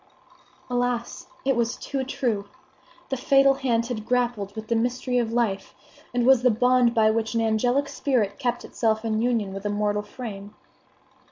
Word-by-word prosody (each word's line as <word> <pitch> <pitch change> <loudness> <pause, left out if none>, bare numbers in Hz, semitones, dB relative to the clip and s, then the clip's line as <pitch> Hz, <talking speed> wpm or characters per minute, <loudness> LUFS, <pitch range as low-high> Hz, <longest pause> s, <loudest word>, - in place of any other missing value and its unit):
Alas! 245 -1 -2 0.2
it 270 -1 +2
was 235 0 0
too 270 -2 -3
true! 235 -6 -2 0.6
The 270 - -1
fatal 275 +2 +4
hand 245 -4 0
had 230 -3 -4
grappled 235 -4 -1
with 220 0 -6
the 235 - +1
mystery 250 +2 0
of 230 -2 -1
life, 225 -5 -1 0.4
and 245 -1 0
was 260 -2 +6
the 250 - +4
bond 245 +1 +3
by 220 -1 +4
which 225 +1 -2
an 230 - +2
angelic 245 +5 +1
spirit 245 -10 -1
kept 245 -3 -2
itself 220 -1 -1
in 220 -1 0
union 230 -5 0
with 195 0 -6
a 205 - -1
mortal 205 0 0
frame. 210 -2 -8
235 Hz, 170 wpm, -25 LUFS, 215-250 Hz, 0.6 s, was